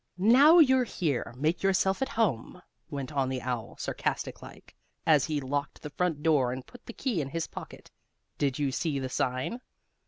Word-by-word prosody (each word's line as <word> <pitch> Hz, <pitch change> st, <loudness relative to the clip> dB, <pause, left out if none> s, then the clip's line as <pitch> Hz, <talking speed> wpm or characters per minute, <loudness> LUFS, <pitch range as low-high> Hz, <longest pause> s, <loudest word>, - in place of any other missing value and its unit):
"Now 260 Hz, -, +7 dB
you're 260 Hz, -6 st, +6 dB
here, 150 Hz, -, -2 dB
make 155 Hz, +5 st, 0 dB
yourself 195 Hz, +2 st, +2 dB
at 265 Hz, -, 0 dB
home," 180 Hz, -, -1 dB, 0.3 s
went 140 Hz, -2 st, -5 dB
on 135 Hz, -3 st, 0 dB
the 130 Hz, -1 st, -3 dB
owl, 125 Hz, -3 st, -4 dB
sarcastic -, -, -3 dB
like, -, -, -14 dB, 0.3 s
as 150 Hz, -4 st, +4 dB
he 155 Hz, -2 st, -1 dB
locked 140 Hz, +1 st, -4 dB
the 150 Hz, -, -6 dB
front 160 Hz, -2 st, -1 dB
door 145 Hz, -6 st, +3 dB
and 130 Hz, 0 st, -6 dB
put 245 Hz, -, -16 dB
the -, -, -5 dB
key 230 Hz, -, -1 dB
in 135 Hz, -, -4 dB
his 165 Hz, +3 st, -2 dB
pocket. -, -, -10 dB, 0.5 s
"Did 140 Hz, -3 st, 0 dB
you 145 Hz, -2 st, 0 dB
see 150 Hz, +1 st, -1 dB
the 130 Hz, -1 st, -3 dB
sign?" 130 Hz, -, -2 dB
150 Hz, 185 wpm, -29 LUFS, 135-195 Hz, 0.5 s, Now